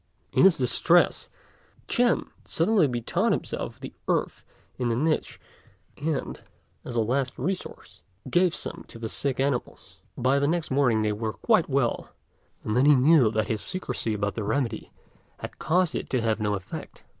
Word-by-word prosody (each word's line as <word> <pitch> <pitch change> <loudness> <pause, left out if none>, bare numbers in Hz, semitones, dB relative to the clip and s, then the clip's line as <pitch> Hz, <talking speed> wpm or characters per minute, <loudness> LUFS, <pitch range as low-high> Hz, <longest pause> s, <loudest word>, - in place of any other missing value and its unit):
In - - +5
his 190 -4 +6
distress, 165 +7 +3 0.6
Ch'ên 245 0 +2 0.2
suddenly 180 -1 +2
bethought 120 -3 0
himself - - -4
of - - -27
the - - -8
earth - - -1 0.4
in 125 -2 0
the 115 - +1
niche; 155 +5 -1 0.6
and, 155 +1 -3 0.4
as 120 - -7
a 115 - +3
last 130 +3 -1
resource, 190 0 -5 0.3
gave 175 +5 +2
some - - -5
to - - -10
the 115 -1 -5
sick 135 +3 -1
animals. 135 -2 -3 0.2
By 130 +3 +2
the 140 - +1
next 165 -1 -1
morning 125 -5 +2
they 105 - +1
were 110 +1 -3
quite 215 -9 +2
well, 135 -3 0 0.5
and 105 - -2
then 125 +3 +4
he 150 0 +7
knew 135 -2 +5
that 110 0 0
his 110 0 -2
secrecy 185 - -2
about 100 0 -1
the 110 - -4
remedy 125 +3 -2 0.5
had - - -9
caused 180 -1 +1
it - - -4
to 130 - 0
have 110 -1 0
no 105 -1 0
effect. 95 -1 -8
130 Hz, 170 wpm, -26 LUFS, 115-160 Hz, 0.6 s, he